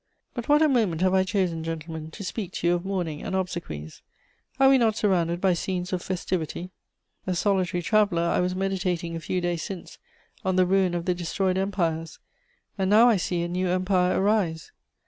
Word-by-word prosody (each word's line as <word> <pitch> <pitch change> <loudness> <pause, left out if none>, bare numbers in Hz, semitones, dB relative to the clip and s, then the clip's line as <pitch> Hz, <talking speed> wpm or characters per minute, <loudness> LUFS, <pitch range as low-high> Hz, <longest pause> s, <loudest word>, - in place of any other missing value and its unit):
"But 240 0 -6
what 295 +2 +6
a - - +5
moment 215 - +1
have 185 0 +3
I 190 0 +4
chosen, 185 -4 -1
gentlemen, 160 -1 -5
to 200 - -9
speak 190 -1 -5
to - - -4
you 175 - +4
of 175 0 -1
mourning 180 -6 -3
and - - -3
obsequies! 170 - -4 0.6
Are 270 - +6
we 270 -1 +6
not 225 -3 +2
surrounded 175 -5 +1
by 190 -1 +3
scenes 180 +1 -3
of 180 - -1
festivity? 180 -1 -3 0.6
A 185 - 0
solitary 180 -2 0
traveller, 200 -3 +2
I 170 - +1
was 180 0 0
meditating 185 -3 -1
a - - -3
few 180 +2 -2
days 175 -2 -1
since 185 +2 -7 0.4
on 190 -2 0
the 185 0 +4
ruin 185 -1 +2
of 170 -1 -3
the 180 - +2
destroyed 185 +2 -1
empires: 170 -5 -1 0.6
and 190 -1 +1
now 225 +4 +7
I 225 - +4
see 175 -1 -1
a - - -2
new 180 +1 -1
empire 185 0 +2
arise. 190 -6 0
185 Hz, 195 wpm, -26 LUFS, 170-195 Hz, 0.6 s, now